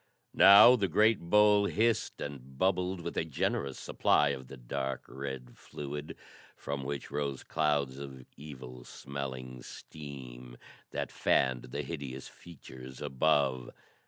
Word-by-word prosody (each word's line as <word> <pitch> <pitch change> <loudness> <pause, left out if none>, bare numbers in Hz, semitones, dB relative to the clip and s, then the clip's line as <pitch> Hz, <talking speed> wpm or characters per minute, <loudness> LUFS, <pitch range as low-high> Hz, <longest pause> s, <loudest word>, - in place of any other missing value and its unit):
Now 105 +5 +9
the 100 -5 0
great 105 +6 +4
bowl 105 +3 +4
hissed 115 +1 0
and 65 -2 -7
bubbled 90 0 +1
with 85 - -5
a - - +2
generous 70 -3 -2
supply 75 - +2
of 65 -2 -4
the 70 - -10
dark 65 +1 -4
red 65 -2 -7
fluid, 75 +1 -7 0.4
from 70 -1 -4
which 70 +1 -5
rose 70 -2 -3
clouds 75 -4 0
of 65 -2 -9
evil 65 -4 -10
smelling 65 -2 -7
steam 65 -5 -10 0.3
that - - -4
fanned 65 -2 +1
the 70 +4 -4
hideous 70 -3 -6
features 65 -6 -12
above. 65 -3 +1
70 Hz, 130 wpm, -31 LUFS, 65-80 Hz, 0.4 s, Now